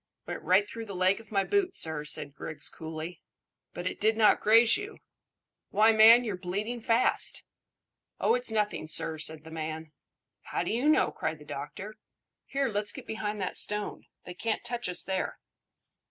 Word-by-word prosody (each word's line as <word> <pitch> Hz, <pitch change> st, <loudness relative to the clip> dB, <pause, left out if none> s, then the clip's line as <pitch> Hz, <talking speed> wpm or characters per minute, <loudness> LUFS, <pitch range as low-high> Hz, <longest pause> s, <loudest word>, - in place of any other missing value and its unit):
"Went -, -, -6 dB
right 195 Hz, +3 st, +3 dB
through 230 Hz, 0 st, -7 dB
the 200 Hz, -, -7 dB
leg 185 Hz, +3 st, +2 dB
of 225 Hz, -, -16 dB
my 195 Hz, -2 st, +2 dB
boot, 390 Hz, -, 0 dB
sir," 160 Hz, -2 st, -2 dB
said 150 Hz, -1 st, -1 dB
Griggs 150 Hz, -2 st, -4 dB
coolly. 160 Hz, +1 st, -7 dB, 0.5 s
"But 175 Hz, -, -7 dB
it -, -, -3 dB
did 220 Hz, +1 st, +2 dB
not 215 Hz, -2 st, +5 dB
graze 225 Hz, +2 st, +6 dB
you? 415 Hz, +1 st, -6 dB, 0.7 s
Why, 220 Hz, +2 st, +4 dB
man, 225 Hz, +2 st, +8 dB
you're 205 Hz, -6 st, -4 dB
bleeding 205 Hz, +6 st, -3 dB
fast!" 230 Hz, +2 st, +1 dB, 0.8 s
"Oh, -, -, +3 dB
it's 250 Hz, 0 st, +3 dB
nothing, 210 Hz, -7 st, -1 dB
sir," 160 Hz, 0 st, +1 dB
said 155 Hz, 0 st, -2 dB
the 160 Hz, -, -12 dB
man. 160 Hz, 0 st, -5 dB, 0.5 s
"How -, -, -2 dB
do -, -, -3 dB
you 245 Hz, +7 st, +1 dB
know?" 310 Hz, -, +3 dB
cried 160 Hz, -, -3 dB
the 150 Hz, -, -15 dB
doctor. 190 Hz, +11 st, -7 dB, 0.5 s
"Here, 275 Hz, 0 st, 0 dB
let's 210 Hz, -2 st, 0 dB
get -, -, -9 dB
behind 215 Hz, -1 st, -4 dB
that 185 Hz, -, -3 dB
stone. 210 Hz, 0 st, -1 dB, 0.2 s
They 180 Hz, -, -8 dB
can't 220 Hz, +5 st, -2 dB
touch 240 Hz, -3 st, -2 dB
us 180 Hz, -, +1 dB
there." 190 Hz, 0 st, -3 dB
205 Hz, 180 wpm, -29 LUFS, 160-225 Hz, 0.8 s, man